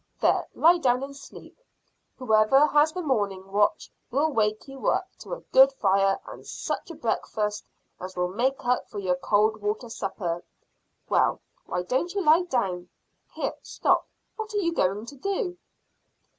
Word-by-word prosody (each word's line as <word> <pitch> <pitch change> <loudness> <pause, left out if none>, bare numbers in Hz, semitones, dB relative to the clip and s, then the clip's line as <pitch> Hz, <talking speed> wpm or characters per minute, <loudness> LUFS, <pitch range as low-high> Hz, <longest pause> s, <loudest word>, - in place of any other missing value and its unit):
There, - - +2
lie 345 +2 +5
down 255 -3 +2
and 280 0 -7
sleep. 280 - -13 0.6
Whoever 250 +3 +4
has 300 +1 +3
the 360 +2 -4
morning 200 -8 -1
watch 205 +1 +1 0.2
will 295 +5 +1
wake 215 -2 0
you 270 -1 -6
up - - +1
to - - -7
a - - -13
good 265 +1 +7
fire 195 -5 +2
and - - -10
such - - -4
a 335 - -7
breakfast 210 -4 -2 0.3
as 185 +1 -7
will 180 0 +1
make 250 +8 -1
up 250 0 0
for - - -9
your 185 -3 0
cold 215 +3 +2
water 210 +3 -2
supper. 180 -5 -4 0.6
Well - - +2 0.3
why 180 0 -2
don't 265 - -1
you 395 - 0
lie 325 +4 +5
down? 185 - -2 0.4
Here: - - -2
stop! - - +1 0.3
What 440 0 -5
are - - +2
you 335 -4 +1
going 200 - 0
to 280 - -10
do?" 375 - -2
240 Hz, 165 wpm, -26 LUFS, 200-295 Hz, 0.6 s, good